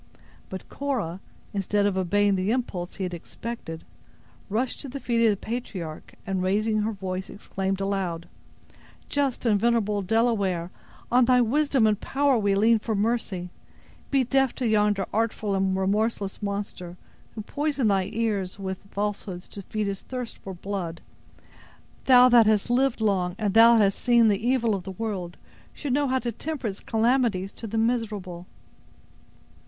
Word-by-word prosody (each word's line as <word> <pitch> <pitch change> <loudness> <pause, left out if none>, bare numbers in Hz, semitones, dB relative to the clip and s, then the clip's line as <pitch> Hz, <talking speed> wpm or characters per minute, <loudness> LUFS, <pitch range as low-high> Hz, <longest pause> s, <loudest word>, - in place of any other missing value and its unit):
But 190 - -7
Cora, 235 -12 -3 0.3
instead 200 +1 +1
of 200 -2 +1
obeying 200 +2 +2
the 190 +1 0
impulse 205 -7 -2
he 195 - -4
had 180 -1 -3
expected, 170 -1 -7 0.7
rushed 240 +5 -1
to 275 - -7
the 275 +2 -6
feet 235 -2 +1
of - - +6
the 205 - +1
patriarch, 190 -9 -6
and, 190 -1 -1
raising 215 +4 +1
her 215 +2 0
voice, 190 -2 -5
exclaimed 195 -1 -3
aloud: 190 -4 -2 0.8
"Just 280 -3 -1
and 210 -3 +3
venerable 210 -3 +1
Delaware, 195 -5 +1 0.4
on 250 0 +5
thy 250 0 +4
wisdom 270 +1 +2
and 210 -1 +2
power 280 0 +2
we 200 -3 +2
lean 220 +3 +4
for 220 0 -2
mercy! 200 -4 -1 0.6
Be 275 -2 +3
deaf 270 +1 +1
to 250 - -1
yonder 210 -2 +2
artful 215 -2 0
and 190 -1 +1
remorseless 200 +1 0
monster, 200 -3 -4 0.4
who 220 - -4
poisons 285 -1 0
thy 195 -1 +1
ears 210 -5 -1
with 190 -1 -4
falsehoods 200 -3 -4
to 200 - -8
feed 215 +2 -3
his 200 -1 -3
thirst 250 -3 -6
for 190 -1 -8
blood. 175 -3 -5 1.0
Thou 250 -1 +8
that 240 -3 +6
hast 215 +2 +2
lived 255 -1 +2
long, 185 -4 +1
and 205 -3 -1
that 230 +1 +7
hast 200 -2 +2
seen 235 -2 +5
the 205 +1 0
evil 240 -4 +2
of 195 - -2
the 190 +1 -6
world, 190 -5 -4 0.4
should 285 -4 -3
know 285 +1 +2
how 260 0 +1
to 240 -2 -2
temper 295 +3 -5
its 200 -3 -3
calamities 225 -4 +1
to 225 - -7
the 225 +2 -3
miserable." 210 -7 -1
210 Hz, 160 wpm, -26 LUFS, 190-235 Hz, 1.0 s, Thou